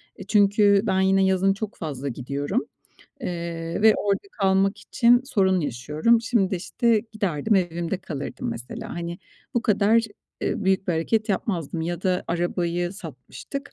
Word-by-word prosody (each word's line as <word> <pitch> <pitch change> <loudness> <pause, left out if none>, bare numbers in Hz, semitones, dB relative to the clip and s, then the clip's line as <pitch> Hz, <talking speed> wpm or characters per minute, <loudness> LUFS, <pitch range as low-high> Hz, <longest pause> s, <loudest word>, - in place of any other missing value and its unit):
E, - - -9
çünkü 205 -1 +4
ben 190 -4 +1
yine 190 0 +3
yazın 190 +1 +3
çok 210 +1 -6
fazla 140 -4 -5
gidiyorum, 140 - -2 0.6
eee, 170 -3 -4
ve 220 -1 +7
orada 200 -1 0
kalmak 195 -1 +2
için 240 0 +3
sorun 190 -8 +2
yaşıyorum. 150 - +1
Şimdi 225 -5 +1
de, 190 - 0
işte, 225 +4 +1
giderdim, 200 -2 0
evimde 175 -1 0
kalırdım, 145 -7 -5
mesela. 120 +2 -7
Hani, 170 0 -5 0.4
bu 240 - +1
kadar, 215 +1 +3 0.4
eee, 210 - -2
büyük 190 0 +1
bir - - +3
hareket 215 +7 0
yapmazdım 175 -5 -2
ya 170 +2 -3
da 185 -1 0
arabayı 175 0 -1
satmıştık. 190 - -8
190 Hz, 150 wpm, -24 LUFS, 170-210 Hz, 0.6 s, ve